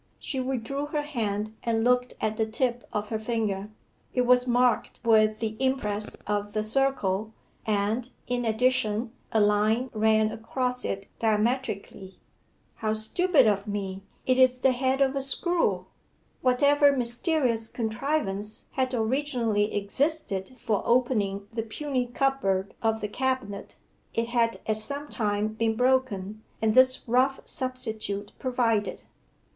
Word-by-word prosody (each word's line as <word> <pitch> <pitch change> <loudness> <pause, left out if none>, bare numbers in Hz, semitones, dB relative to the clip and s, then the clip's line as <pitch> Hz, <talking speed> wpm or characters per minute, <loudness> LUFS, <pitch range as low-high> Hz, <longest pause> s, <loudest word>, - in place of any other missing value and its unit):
She 270 - -4
withdrew 265 +2 -2
her 295 0 -2
hand 215 -7 -2
and 225 -1 0
looked 250 +1 +2
at 220 0 -1
the 220 0 0
tip 240 +2 -1
of 210 0 -3
her 220 - -2
finger: 215 -3 -2 0.5
it 250 - +3
was 250 0 +4
marked 245 -1 +2
with 215 -1 +4
the 220 -1 -3
impress 215 -6 0
of 205 0 -2
the 215 - 0
circle, 220 -4 +1 0.3
and, 215 +4 0 0.2
in 245 0 -1
addition, 225 -1 +1 0.2
a 220 - +2
line 215 +4 +2
ran 220 0 +3
across 250 +2 -2
it 195 0 -3
diametrically. 215 -3 -1 0.6
'How 215 -1 -1
stupid 270 +7 +3
of 205 -1 +1
me; 195 -2 -4 0.2
it 255 0 +2
is 255 -1 +5
the 260 +1 +3
head 260 +2 0
of 270 0 +3
a 275 - 0
screw.' 340 +6 0 0.6
Whatever 285 +2 +4
mysterious 240 -1 +1
contrivance 220 -3 -2
had 260 -1 -1
originally 230 -3 0
existed 205 0 -1
for 215 -3 -1
opening 215 -5 +1
the 225 - -1
puny 250 +3 -2
cupboard 240 -7 0
of 225 -1 0
the 210 - -1
cabinet, 255 -4 -3 0.4
it 230 0 0
had 235 -1 +1
at 215 -1 +1
some 280 +6 -3
time 210 -2 0
been 225 +1 -1
broken, 220 -5 0 0.2
and 220 -1 +2
this 255 +1 +5
rough 255 +3 +2
substitute 220 -7 -3
provided. 230 -5 0
230 Hz, 135 wpm, -27 LUFS, 215-255 Hz, 0.6 s, is